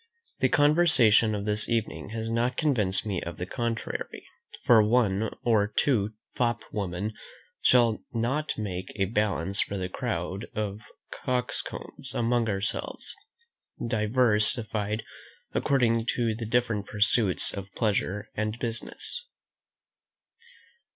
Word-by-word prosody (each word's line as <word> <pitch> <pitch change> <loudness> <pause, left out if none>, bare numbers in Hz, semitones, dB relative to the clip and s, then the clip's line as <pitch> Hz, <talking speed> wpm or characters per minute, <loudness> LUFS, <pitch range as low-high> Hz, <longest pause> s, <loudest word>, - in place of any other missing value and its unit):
The - - +3
conversation 145 -9 +5
of 100 0 -4
this 105 0 +1
evening 115 -3 -2
has 110 +1 -4
not 115 +2 0
convinced 110 - +2
me 100 -5 -2
of 85 0 -6
the 90 - -3
contrary; 115 +3 -4 0.4
for 115 -3 +6
one 110 -2 +2
or 110 -4 +3
two 110 -1 +1 0.2
fop 120 -2 0
women 100 +1 -3 0.5
shall 120 -3 +4
not 125 +6 -1
make 95 -4 -4
a 100 -2 +1
balance 100 -3 0
for 100 - -2
the 95 -1 -3
crowd 95 -3 -3
of 105 -1 -3 0.3
coxcombs 125 -1 -4
among 120 -1 +1
ourselves, 100 +1 -3 0.7
diversified 110 -1 +2 0.5
according 115 -4 +2
to 115 -2 +1
the 115 0 -5
different 115 -3 0
pursuits 105 -2 +3
of 100 0 -7
pleasure 105 -2 -1
and 110 +1 -2
business. 120 - -4
110 Hz, 115 wpm, -27 LUFS, 100-120 Hz, 0.7 s, for